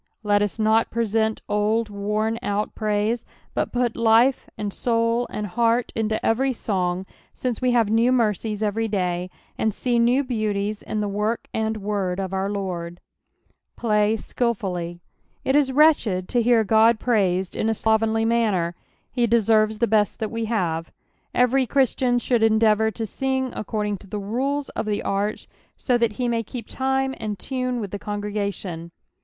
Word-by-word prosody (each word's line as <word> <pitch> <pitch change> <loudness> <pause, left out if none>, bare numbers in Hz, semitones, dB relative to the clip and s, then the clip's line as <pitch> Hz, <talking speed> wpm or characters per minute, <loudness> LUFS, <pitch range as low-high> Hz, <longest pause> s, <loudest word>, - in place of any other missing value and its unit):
Let 205 -1 +3
us 205 +1 -1
not 220 +1 +3
present 220 -1 0
old 215 +2 +1
worn 210 +2 -1
out 205 +1 -2
prsise, 215 +2 0 0.3
but - - -1
put 245 -2 0
life, 230 +3 +3
and 205 -2 -3
soul, 230 0 +1
and 210 - -4
heart, 230 +3 +1
into 220 -1 -1
every 260 +4 +2
song, 185 -5 -2 0.3
since 250 -2 -3
we 250 -1 +2
have 230 -3 +3
new 230 +3 +4
mercies 220 -3 0
every 220 +2 0
day, 180 -3 -1 0.3
and 220 - +2
see 240 +3 0
new 245 +4 +3
beauties 215 -4 -2
in 215 - -3
the 205 - -1
work 210 +3 -2
and 220 0 -1
word 195 -3 -2
of 190 -1 -3
our 190 +1 -1
Lord. 180 -4 -4 0.4
" - - -45
Flag 210 -2 +2
ilil/uUj/.^' 185 -8 -2 0.5
It 265 - +2
is 285 -2 +3
wretched 255 - +3
to 240 - +2
hear 230 -1 +3
Qod 220 +2 +5
praised 190 -6 +1
in 220 - 0
a 225 - +1
slovenly 220 +1 +1
manner. 215 -7 +1 0.4
Be 240 -2 +2
deserves 220 -1 +3
the 235 - +2
best 215 -2 +2
that 220 - -3
we 230 -1 -2
have. 170 -7 -1 0.4
Every 250 +1 +3
Christian 255 -1 +2
should 240 -1 +1
endeavour 220 0 +4
to 225 +1 -4
sing 265 +3 -2
according 210 -1 -2
to 200 - -15
the 210 - -4
rules 265 +8 -2
of - - -4
the 210 -1 -1
art. 200 +2 -1 0.3
so 250 - +1
that 230 -2 +1
he 245 +3 -2
nuiy 230 -1 0
keep 230 +1 -7
time 265 0 0
and 215 -2 -3
tune 255 +3 -2
with 205 -4 -5
the 205 - -4
congregation. 200 -5 -4
220 Hz, 170 wpm, -23 LUFS, 205-235 Hz, 0.5 s, Qod